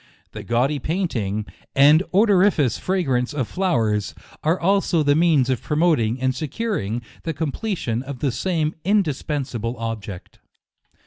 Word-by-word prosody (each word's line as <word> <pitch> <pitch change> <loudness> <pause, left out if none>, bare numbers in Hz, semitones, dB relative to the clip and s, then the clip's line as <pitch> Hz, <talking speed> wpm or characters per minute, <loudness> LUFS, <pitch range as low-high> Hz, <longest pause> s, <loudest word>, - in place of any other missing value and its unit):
The - - -7
gaudy 130 +5 0
painting, 120 - -2 0.3
and 145 +4 +6
odoriferous 190 - +3
fragrance 145 -8 0
of 130 -6 -1
flowers, 115 - 0 0.3
are 165 +4 +1
also 190 -3 +2
the 145 0 +4
means 155 -5 +3
of 130 -4 -1
promoting 150 -7 +1
and 130 0 +1
securing 130 - -3 0.2
the 165 -2 -4
com 155 -1 -2
pletion 150 - -2
of 135 0 -7
the 135 +1 0
same 160 +1 -1
indispensable 145 - -1
object. 110 -5 -6
145 Hz, 130 wpm, -22 LUFS, 120-175 Hz, 0.3 s, and